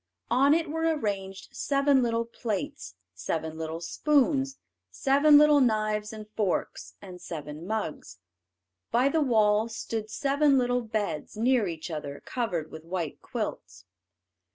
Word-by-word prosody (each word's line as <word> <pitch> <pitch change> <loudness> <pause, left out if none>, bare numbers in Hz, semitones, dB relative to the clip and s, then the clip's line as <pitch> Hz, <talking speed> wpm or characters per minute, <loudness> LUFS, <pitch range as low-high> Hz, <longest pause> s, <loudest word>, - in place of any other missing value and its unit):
On 275 +4 +5
it 330 0 0
were 320 +2 -3 0.2
arranged 195 -5 -4
seven 275 -1 +2
little 230 -1 0
plates, 195 - -5 0.2
seven 160 - -3
little 160 0 -4
spoons, 275 - +1 0.3
seven 285 +2 +5
little 300 -1 +6
knives 215 -3 +1
and 215 -1 -9
forks, 205 -5 -2
and 180 -2 -10
seven 150 +1 -7
mugs. 195 - -4 0.7
By 250 +3 +3
the 315 +2 +1
wall 220 -4 +3
stood 220 -1 -4
seven 280 +3 +2
little 245 -1 +1
beds, 210 -7 -3
near 235 -1 +2
each 165 0 -6
other, 145 -2 -6
covered 180 -11 -3
with 160 - -9
white 170 -2 -4
quilts. 95 -1 -5
215 Hz, 130 wpm, -28 LUFS, 170-270 Hz, 0.7 s, little